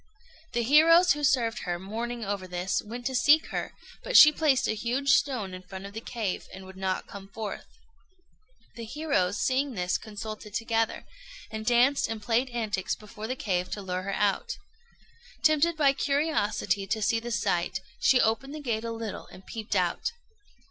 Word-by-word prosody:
The 235 - +1
heroes 330 +7 +6
who 295 0 -6
served 245 -5 +2
her, 175 -1 -3
mourning 230 +5 -5
over 195 -2 -3
this, 180 +1 -1
went 240 +3 -8
to 265 - -1
seek 295 +5 +4
her; - - -4 0.3
but - - +3
she 305 - +11
placed 295 -4 +2
a - - +1
huge 245 +6 -2
stone 235 -12 +2
in 185 - -7
front 190 +1 -9
of 200 - -9
the 220 - -6
cave, 220 -6 -4
and 190 0 -10
would 190 0 -12
not 190 -1 -2
come 195 -1 -10
forth. 210 +1 -6 1.1
The 235 - -8
heroes, 225 -7 -1
seeing 265 0 0
this, 180 -1 0
consulted 215 -1 -8
together, 225 0 -1 0.5
and 220 0 -6
danced 245 +4 +4
and 225 -1 -4
played 235 +4 0
antics 215 -6 -2
before 215 +1 -9
the 255 - -2
cave 180 -7 -1
to 205 - -5
lure 185 -1 -3
her 195 +1 -3
out. 205 -2 0 0.9
Tempted 315 +1 +3
by 280 -3 +4
curiosity 275 - 0
to 220 +2 -1
see 225 +2 +2
the 240 +1 -6
sight, 190 -3 0 0.2
she 255 - +4
opened 245 +7 0
the - - -6
gate 230 -6 -2
a 230 - -3
little 225 -2 -6
and 190 - -14
peeped 220 -2 -5
out. 190 - 0
225 Hz, 180 wpm, -28 LUFS, 195-265 Hz, 1.1 s, she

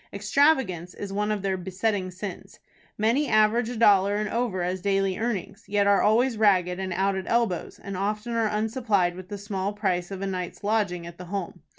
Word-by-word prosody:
Extravagance 205 - +1
is 200 -1 -6
one 210 +1 0
of 205 -2 -2
their 190 -1 0
besetting 190 +1 -2
sins. 185 +1 -8 0.4
Many 235 +8 +2
average 215 +2 +3
a 245 - -4
dollar 200 -2 +5
and 210 0 -1
over 230 -6 -1
as 180 +1 -2
daily 195 -1 0
earnings, 210 -2 -3
yet 205 0 +2
are 200 -1 +4
always 230 +3 +3
ragged 185 -4 +3
and 190 -1 -3
out 190 +2 +1
at 190 -1 -4
elbows, 230 -7 0
and 200 -1 -7
often 210 +4 -2
are 225 -2 +1
unsupplied 215 -4 0
with 185 0 -10
the 205 - -5
small 200 -1 -3
price 185 -4 -1
of 195 -1 -5
a - - -1
night's 185 -1 -4
lodging 200 -5 0
at 170 0 -10
the 180 - -7
Home. 180 -1 -5
200 Hz, 200 wpm, -26 LUFS, 185-215 Hz, 0.4 s, dollar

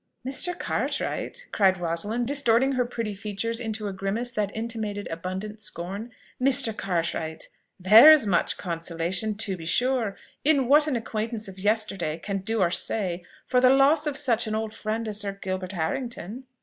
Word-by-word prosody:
"Mr. 335 +6 -1
Cartwright!" - - -3
cried 190 -2 +3
Rosalind, 175 +8 -2
distorting 270 -1 +2
her 255 -2 0
pretty 230 -3 -4
features 210 +3 -3
into 220 -3 -3
a 200 - -4
grimace 195 +6 -2
that 210 -3 -2
intimated 220 -3 -4
abundant 190 +6 -5
scorn, 195 +7 -3 0.3
"Mr. 255 -4 +2
Cartwright! 165 -4 -3 0.3
There 215 +11 +9
is 305 -7 +6
much 180 -4 +1
consolation, 170 +4 -2
to 200 -2 +1
be 165 -2 -9
sure, 240 +1 0 0.3
in 280 -4 +3
what 295 +3 +5
an 290 - 0
acquaintance 225 -1 -3
of 190 0 -10
yesterday 195 -6 +1
can 195 +3 -4
do 220 +3 -1
or 175 -2 +2
say, 180 -3 0 0.2
for 250 0 +2
the 255 - +6
loss 280 +4 +4
of 285 -2 -2
such 240 -5 +1
an 215 - -2
old 220 0 -3
friend 220 +1 -3
as 210 -1 -2
Sir 200 -2 -1
Gilbert 185 0 -4
Harrington!" 230 +6 -4
215 Hz, 165 wpm, -25 LUFS, 190-245 Hz, 0.3 s, There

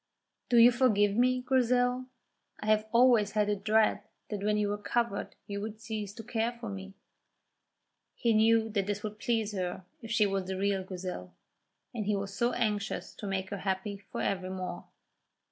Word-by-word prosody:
"Do 240 - +4
you 235 +1 +9
forgive 210 -5 +3
me, 255 +2 +3
Grizel? 250 0 +2 0.5
I - - -7
have 215 0 +2
always 235 -3 +5
had 210 -1 +2
a 210 - +2
dread 215 +2 +2 0.3
that 205 -2 -3
when 210 0 +2
you 205 -1 +1
recovered 205 +1 -2
you 200 0 -4
would 215 0 -6
cease 215 -3 -4
to 225 - -8
care 225 +1 -1
for 235 -2 -7
me." 195 0 -7 1.2
He 235 -2 +2
knew 225 +1 +4
that 200 -2 0
this 205 +1 -2
would 210 0 -5
please 225 -1 0
her 185 -2 -4 0.2
if 225 - -9
she 225 -2 +3
was 195 -1 -1
the 190 0 -3
real 195 0 0
Grizel, 180 - -6 0.6
and 215 -4 -3
he 210 - +2
was 195 0 -4
so 240 +3 +1
anxious 210 -2 -2
to 205 - -7
make 190 0 -2
her 200 - -3
happy 195 +1 -2
for - - -3
evermore. 185 -2 -3
210 Hz, 180 wpm, -30 LUFS, 195-230 Hz, 1.2 s, you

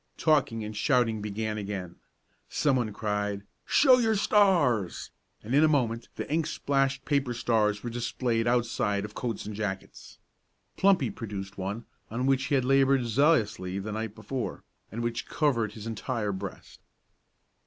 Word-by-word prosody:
Talking 140 -8 +2
and 105 0 -6
shouting 115 -1 +2
began 105 +1 -3
again. 95 -4 -5 0.5
Some 140 -3 +2
one 115 -4 -1
cried, 105 -1 -2 0.2
"Show 260 -3 +6
your 225 -2 +2
stars!" 180 - +2 0.3
and 115 +4 -4
in 145 +3 +5
a - - +6
moment 120 -6 0
the - - -4
ink 160 +1 0
splashed 135 -3 0
paper 140 -4 0
stars 110 -3 +1
were 120 - -3
displayed 120 0 -1
outside 115 -4 +1
of 105 - -9
coats 115 -2 -4
and 105 0 -6
jackets. 100 -2 -5 0.6
Plumpy 190 - +3
produced 100 -3 -6
one 100 +5 -4 0.2
on 120 +4 -2
which 135 0 +2
he 145 - +1
had 130 -2 +1
labored 135 -1 +4
zealously 115 - +2
the 100 +2 -4
night 110 0 -4
before, 120 +4 -5 0.3
and 115 +2 -4
which 120 0 -3
covered 115 -9 0
his 110 -1 -9
entire 115 -1 -2
breast. 95 - -7
115 Hz, 155 wpm, -28 LUFS, 105-135 Hz, 0.6 s, Show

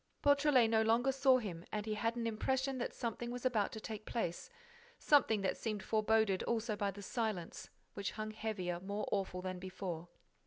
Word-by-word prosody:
Beautrelet 285 -4 +5
no 220 0 +3
longer 230 +4 +3
saw 265 -1 +5
him 185 -8 -5
and 210 0 -2
he 215 - -1
had 230 +2 0
an 235 -1 -2
impression 260 +4 0
that 240 - -2
something 235 0 -3
was 245 +1 -5
about 220 -6 +2
to 220 - -5
take 215 -1 -6
place, 175 -8 -2 0.5
something 245 -8 +4
that 190 - 0
seemed 215 -3 -3
foreboded 215 -2 +2
also 230 -1 -1
by 205 -1 0
the 200 +1 -7
silence, 215 -6 -3 0.2
which 200 0 -3
hung 215 0 -4
heavier, 200 -5 -3
more 200 +3 -3
awful 190 -2 -1
than 185 -1 -4
before. 185 -2 -5
220 Hz, 185 wpm, -36 LUFS, 195-235 Hz, 0.5 s, Beautrelet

